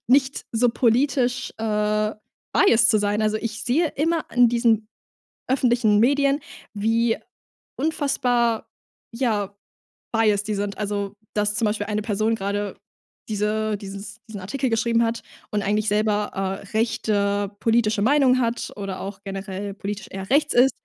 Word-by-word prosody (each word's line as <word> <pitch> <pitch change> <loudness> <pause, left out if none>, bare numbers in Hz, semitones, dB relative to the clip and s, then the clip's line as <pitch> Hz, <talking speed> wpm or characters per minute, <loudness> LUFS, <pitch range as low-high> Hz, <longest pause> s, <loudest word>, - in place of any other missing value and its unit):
nicht 265 +1 +3
so 240 +2 +3
politisch, 250 +1 +1
äh, 210 0 0 0.4
biased 225 - +5
zu 215 - +4
sein. 205 +1 0
Also, 215 0 +1
ich 230 +1 -4
sehe 310 +8 +2
immer 325 +2 +1
in 245 -1 +6
diesen 230 -2 +2 0.6
öffentlichen 240 -5 +3
Medien, 280 +3 +3 0.3
wie 225 +2 +1 0.6
unfassbar, 250 -6 0 0.4
ja, 210 -5 -1 0.6
biased 215 -2 +2
die 215 - -1
sind. 200 0 -3
Also, 205 -1 -3 0.2
dass 210 0 0
zum 225 - +1
Beispiel 210 0 -1
eine 210 0 -1
Person 215 +1 0
grade 200 -1 -3 0.5
diese 215 0 0
dieses 200 +1 -8
diesen 210 -3 -7
Artikel 255 +8 -2
geschrieben 230 +1 +2
hat 230 0 -1 0.3
und 205 -1 0
eigentlich 210 +2 0
selber, 210 0 +1 0.4
äh, - - -12
rechte 205 -3 0
politische 225 -2 +2
Meinung 260 +1 +4
hat 235 -1 -1
oder 195 -2 -5
auch 195 0 -7
generell 195 0 -5
politisch 200 0 -5
eher 190 0 -6
rechts 295 +2 +3
ist. 255 +2 +5
220 Hz, 140 wpm, -23 LUFS, 205-240 Hz, 0.6 s, in